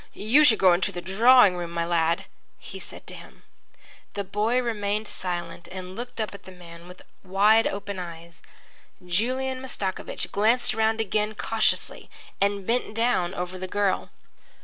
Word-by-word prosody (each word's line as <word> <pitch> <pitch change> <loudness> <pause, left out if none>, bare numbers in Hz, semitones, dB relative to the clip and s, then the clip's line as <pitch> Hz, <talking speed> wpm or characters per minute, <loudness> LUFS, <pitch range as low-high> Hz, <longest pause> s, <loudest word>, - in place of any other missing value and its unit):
"You 245 +9 +4
should 235 -7 +6
go 185 -2 +5
into 175 +2 0
the 175 - -6
drawing 205 +3 +5
room, 175 -1 -4
my 170 0 -2
lad," 170 0 +1 0.3
he - - -10
said - - -9
to - - -7
him. - - -13 0.7
The 200 - -2
boy 210 +5 0
remained 215 -3 -2
silent 175 -3 -5
and 185 0 -7
looked 240 +1 -7
up 215 -3 -2
at 200 - -12
the 190 - -11
man 170 -1 -13
with 180 0 -13 0.2
wide 205 +4 +4
open 200 -1 -5
eyes. 170 -1 -9 0.6
Julian 255 +8 -1
Mastakovich 200 -7 -3
glanced 225 +5 +3
round 220 0 +1
again 215 0 -1
cautiously 225 +1 -1 0.3
and 200 -1 +1
bent 230 -1 -1
down 225 -6 +1
over 180 0 -5
the 185 - -4
girl. 200 0 0
200 Hz, 160 wpm, -25 LUFS, 180-225 Hz, 0.7 s, should